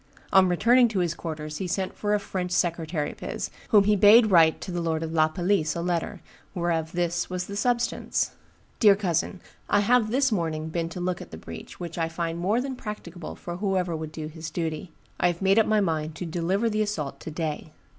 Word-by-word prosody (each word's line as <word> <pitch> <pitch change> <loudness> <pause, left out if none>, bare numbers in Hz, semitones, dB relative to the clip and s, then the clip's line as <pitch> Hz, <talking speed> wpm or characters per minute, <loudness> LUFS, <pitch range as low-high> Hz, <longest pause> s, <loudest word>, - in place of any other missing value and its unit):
On 190 -1 +7
returning 240 +8 +5
to 220 -3 -4
his 175 -2 +1
quarters 155 -3 -6
he 190 - -3
sent 190 +1 -2
for 210 0 0
a - - +1
French 185 -2 -4
secretary 165 -3 -1
of - - -15
his, - - -4 0.2
whom 210 -3 +6
he 210 +1 +3
bade 215 +2 +7
write 165 -3 +5
to 185 - -5
the 175 -1 -2
lord 165 -1 -1
of 160 - -4
La 155 -1 +4
Palisse 175 -1 0
a 170 - -2
letter, 175 -2 -2 0.3
whereof 170 -2 -1
this 175 -1 -1
was 180 -1 -3
the 200 - -7
substance: 240 +3 0 0.5
'Dear 205 -3 +7
cousin, 180 -1 -1 0.3
I 205 - +4
have 230 +1 +3
this 265 +2 +2
morning 160 -5 -1
been 165 0 -2
to 175 - -7
look 180 0 -2
at - - -10
the 80 - -9
breach, 80 0 -10
which 170 -1 -6
I 165 0 0
find 165 0 -3
more 200 +7 +1
than 265 +1 -3
practicable 180 -7 -7
for 175 0 -7
whoever 185 -3 0
would 155 -1 -5
do 155 -1 -6
his 160 +1 -7
duty. 165 0 -4 0.3
I - - +4
have 175 -1 -1
made 195 +2 +4
up 220 - +3
my 215 -1 +3
mind 160 -4 -1
to 180 - -5
deliver 175 +6 0
the 215 -1 0
assault 185 -10 -3
to - - -7
day. 155 -1 -4
175 Hz, 220 wpm, -26 LUFS, 165-205 Hz, 0.5 s, On